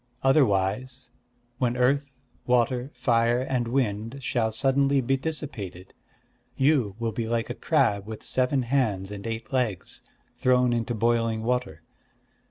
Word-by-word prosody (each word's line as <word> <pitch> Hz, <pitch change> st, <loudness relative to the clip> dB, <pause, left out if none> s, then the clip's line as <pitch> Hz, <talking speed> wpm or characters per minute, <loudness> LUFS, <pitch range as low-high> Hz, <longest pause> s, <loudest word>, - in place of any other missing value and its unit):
Otherwise, 125 Hz, -1 st, +1 dB, 0.5 s
when 125 Hz, -1 st, 0 dB
Earth, 140 Hz, +3 st, +2 dB, 0.4 s
Water, 125 Hz, +1 st, +2 dB
Fire, 120 Hz, -1 st, +2 dB
and 125 Hz, -2 st, -1 dB
Wind 115 Hz, -1 st, -1 dB
shall 115 Hz, -3 st, 0 dB
suddenly 135 Hz, +3 st, +2 dB
be 135 Hz, +1 st, +1 dB
dissipated, 130 Hz, -, -5 dB, 0.6 s
you 130 Hz, -8 st, +2 dB
will 115 Hz, -1 st, -2 dB
be 110 Hz, +1 st, -3 dB
like 115 Hz, 0 st, -1 dB
a -, -, -2 dB
crab 100 Hz, 0 st, +1 dB
with 110 Hz, -1 st, -7 dB
seven 130 Hz, +1 st, +1 dB
hands 110 Hz, -7 st, 0 dB
and 100 Hz, +1 st, -6 dB
eight 115 Hz, +3 st, -5 dB
legs, 120 Hz, -8 st, -2 dB, 0.4 s
thrown 125 Hz, -1 st, +3 dB
into 120 Hz, 0 st, -1 dB
boiling 115 Hz, 0 st, +1 dB
water. 115 Hz, -10 st, -2 dB
120 Hz, 130 wpm, -26 LUFS, 110-130 Hz, 0.6 s, thrown